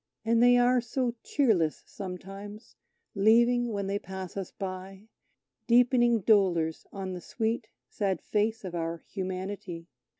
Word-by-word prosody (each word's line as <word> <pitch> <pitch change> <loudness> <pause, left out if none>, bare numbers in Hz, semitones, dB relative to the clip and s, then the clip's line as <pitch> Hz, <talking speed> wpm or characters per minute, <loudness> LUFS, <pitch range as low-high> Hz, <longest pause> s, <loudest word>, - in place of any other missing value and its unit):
And 230 +1 +3
they 245 0 +6
are 245 0 +4
so 240 +1 -1
cheerless 200 - +1
sometimes, 195 +3 -8 0.4
leaving, 235 +3 +4
when 200 -2 -2
they 200 +1 -1
pass 190 -2 -7
us 195 -2 -4
by, 190 +2 -7 0.6
Deepening 240 -1 +4
dolours 180 -7 +2
on 190 -1 -5
the 180 - -6
sweet, 225 +2 -2 0.2
sad 195 -4 -1
face 220 0 -1
of 180 - -6
our 165 -1 -3
Humanity. 185 -2 -5
200 Hz, 130 wpm, -29 LUFS, 185-235 Hz, 0.6 s, they